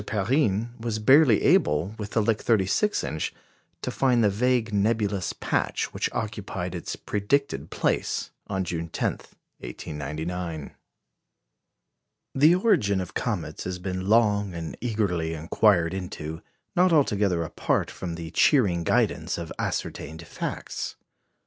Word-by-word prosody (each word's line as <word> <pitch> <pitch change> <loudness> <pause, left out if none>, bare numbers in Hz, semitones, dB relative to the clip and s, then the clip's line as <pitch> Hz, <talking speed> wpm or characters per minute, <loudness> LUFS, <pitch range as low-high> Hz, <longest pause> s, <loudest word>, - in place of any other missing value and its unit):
Perrine 110 +1 +1
was 115 -1 -2
barely 130 +1 +5
able, 75 +7 +3
with 105 0 -6
the 110 - +3
Lick 110 0 +1
36 115 - +2
inch, 80 - -3 0.5
to - - -2
find 125 -3 +2
the 105 - +4
vague 115 +1 +1
nebulous 100 -3 +1
patch - - -1
which - - -1
occupied 95 -4 -4
its 85 - -4
predicted 105 - -1
place - - -1 0.2
on 95 -1 -1
June 85 -2 -4
10, - - 0 0.5
1899. 80 +5 -5 1.6
The 150 +6 +6
origin 110 - +2
of 90 - -5
comets - - -3
has 90 0 -3
been 95 0 -4
long 105 -4 +3
and 85 -1 -5
eagerly 95 -8 -1
inquired 85 +2 +2
into, 85 -4 -5 0.3
not 180 +1 +4
altogether 100 - +2
apart 80 - -1
from 85 -3 -5
the 85 -1 -7
cheering 95 - +3
guidance - - +1
of 85 -1 -5
ascertained 80 +2 -4
facts. - - -5
100 Hz, 125 wpm, -26 LUFS, 85-115 Hz, 1.6 s, The